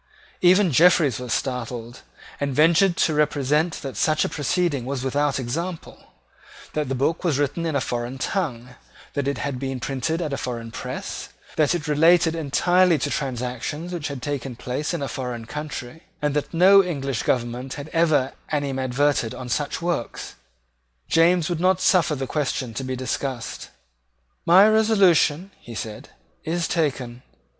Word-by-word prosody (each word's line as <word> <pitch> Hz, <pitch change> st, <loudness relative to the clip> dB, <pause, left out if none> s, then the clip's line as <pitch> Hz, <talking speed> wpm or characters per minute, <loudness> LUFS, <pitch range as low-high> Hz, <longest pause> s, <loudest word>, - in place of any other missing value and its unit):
Even 185 Hz, 0 st, +5 dB
Jeffreys 155 Hz, -, +4 dB
was 125 Hz, -2 st, -6 dB
startled, 120 Hz, -1 st, -3 dB, 0.4 s
and 140 Hz, -2 st, -2 dB
ventured 170 Hz, +4 st, +4 dB
to 160 Hz, -, +2 dB
represent 150 Hz, +2 st, +1 dB
that 135 Hz, -4 st, -5 dB
such 155 Hz, +8 st, +2 dB
a -, -, -2 dB
proceeding 150 Hz, -2 st, 0 dB
was 130 Hz, 0 st, -3 dB
without 140 Hz, +1 st, 0 dB
example, 165 Hz, +8 st, -5 dB, 0.7 s
that 150 Hz, -3 st, -2 dB
the 135 Hz, -, -1 dB
book 150 Hz, +8 st, 0 dB
was 165 Hz, -7 st, +1 dB
written 145 Hz, +4 st, -1 dB
in 155 Hz, -, -2 dB
a 140 Hz, -, +1 dB
foreign 120 Hz, +1 st, -3 dB
tongue, 130 Hz, -7 st, -2 dB, 0.4 s
that 140 Hz, -1 st, -2 dB
it 140 Hz, -, -1 dB
had 140 Hz, -3 st, -3 dB
been 135 Hz, -1 st, -3 dB
printed 135 Hz, +6 st, -2 dB
at 155 Hz, -5 st, -3 dB
a -, -, -1 dB
foreign 115 Hz, -2 st, -5 dB
press, -, -, -6 dB, 0.3 s
that 155 Hz, +2 st, +2 dB
it 165 Hz, -3 st, -4 dB
related 165 Hz, +2 st, +4 dB
entirely 175 Hz, +3 st, +3 dB
to 135 Hz, -, -2 dB
transactions 130 Hz, +5 st, -3 dB
which 165 Hz, -4 st, -3 dB
had 140 Hz, -3 st, -6 dB
taken 135 Hz, -3 st, -3 dB
place 125 Hz, +5 st, -3 dB
in 170 Hz, -5 st, -3 dB
a -, -, -2 dB
foreign 125 Hz, -4 st, -5 dB
country, 150 Hz, +1 st, -6 dB, 0.2 s
and 150 Hz, -1 st, 0 dB
that 150 Hz, 0 st, -2 dB
no 190 Hz, +4 st, +6 dB
English 140 Hz, -8 st, -2 dB
government 125 Hz, +1 st, -2 dB
had 145 Hz, 0 st, -7 dB
ever 155 Hz, -6 st, +2 dB, 0.2 s
animadverted 135 Hz, -3 st, 0 dB
on 125 Hz, -1 st, -7 dB
such 145 Hz, +6 st, -2 dB
works. 170 Hz, -9 st, -3 dB, 0.8 s
James 165 Hz, 0 st, +4 dB
would 175 Hz, -3 st, -2 dB
not 185 Hz, +1 st, +3 dB
suffer 180 Hz, -4 st, +3 dB
the 135 Hz, -1 st, -3 dB
question 130 Hz, -3 st, -2 dB
to 135 Hz, -, -4 dB
be 130 Hz, 0 st, -3 dB
discussed. 130 Hz, -1 st, -4 dB, 0.8 s
"My 185 Hz, +5 st, +8 dB
resolution," 200 Hz, -6 st, +3 dB
he 120 Hz, -, -10 dB
said, 110 Hz, -1 st, -6 dB, 0.3 s
"is 165 Hz, +1 st, -1 dB
taken. 130 Hz, -7 st, -2 dB
145 Hz, 160 wpm, -23 LUFS, 130-165 Hz, 0.8 s, My